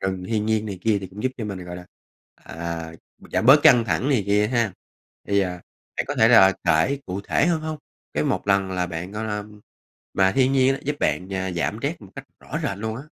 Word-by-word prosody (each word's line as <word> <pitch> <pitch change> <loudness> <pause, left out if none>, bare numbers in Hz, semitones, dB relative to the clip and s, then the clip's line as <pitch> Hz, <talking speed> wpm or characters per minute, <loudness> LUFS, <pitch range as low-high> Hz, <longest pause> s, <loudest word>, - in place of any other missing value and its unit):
rừng 95 -1 -3
thiên 105 0 -1
nhiên 110 -1 0
này 100 -3 -5
kia, 110 -1 +2
thì 95 - -6
cũng 100 +5 -10
giúp 130 0 0
cho 115 - -5
mình, 95 -4 -6
gọi 90 0 -7
là, 90 0 -11 0.5
à, 80 -1 -6 0.3
b - - -19
giảm 115 - +1
bớt 140 +3 +8
căng 120 -3 +6
thẳng 110 - 0
này 130 -8 +2
kia 105 +1 +3
ha. 115 -4 0 0.6
Thì, 100 0 +3
à, 95 -2 0 0.5
bạn - - -1
có - - -3
thể 110 - +5
là 95 -6 +7
kể 140 +1 +2
cụ 95 +2 -4
thể - - +1
hơn 170 -2 +1
hông? 155 0 -5 0.4
Cái - - 0
một - - -1
lần 100 -1 +2
là 90 -1 -1
bạn, 90 +2 -6
gọi 105 +1 -4
là 105 -1 -3 0.7
mà 95 0 +3
thiên 130 +2 +2
nhiên 135 0 +3
giúp 145 +1 -2
bạn, 95 +1 -1
à, 95 -1 -2
giảm 85 - -2
stress - - -2
một - - -12
cách - - -7 0.2
rõ - - -5
rệt 100 - -2
luôn 110 +1 -4
á. 135 - -7
105 Hz, 240 wpm, -23 LUFS, 95-120 Hz, 0.7 s, bớt